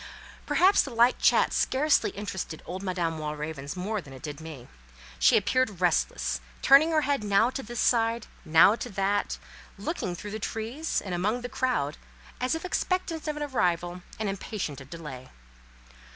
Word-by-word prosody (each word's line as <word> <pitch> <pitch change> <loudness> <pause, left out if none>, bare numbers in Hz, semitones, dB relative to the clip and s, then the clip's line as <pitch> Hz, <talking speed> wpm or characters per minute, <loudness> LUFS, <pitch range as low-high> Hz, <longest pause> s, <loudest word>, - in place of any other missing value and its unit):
Perhaps 380 +2 +5
the - - -4
light 235 +2 +4
chat - - +4
scarcely 290 +3 +2
interested 190 -5 -5
old 185 +2 -5
Madame 175 -4 -2
Walravens 150 -1 -5
more 200 +3 -2
than 140 -5 -13
it 130 - -12
did 150 0 -6
me; 155 -6 -9 0.5
she 60 - +6
appeared 215 -2 +1
restless, - - +1 0.2
turning 280 +4 +7
her 315 -1 +3
head 285 -6 0
now 210 +4 +3
to 270 - -4
this 240 -1 -6
side, 230 -1 +2 0.2
now 165 +5 +6
that, 205 -3 -1 0.4
looking 185 - -3
through 205 +4 -7
the 215 - -4
trees, 230 +9 -2
and 190 - -5
among 210 +8 0
the 245 - -5
crowd, 170 - -1 0.4
as 255 +5 0
if 325 - -5
expectant 360 -3 -1
of 300 -1 -2
an 300 - -2
arrival 180 - 0 0.2
and 215 - -2
impatient 195 -7 -4
of 135 - -13
delay. 150 -6 -8
200 Hz, 165 wpm, -27 LUFS, 165-255 Hz, 0.5 s, turning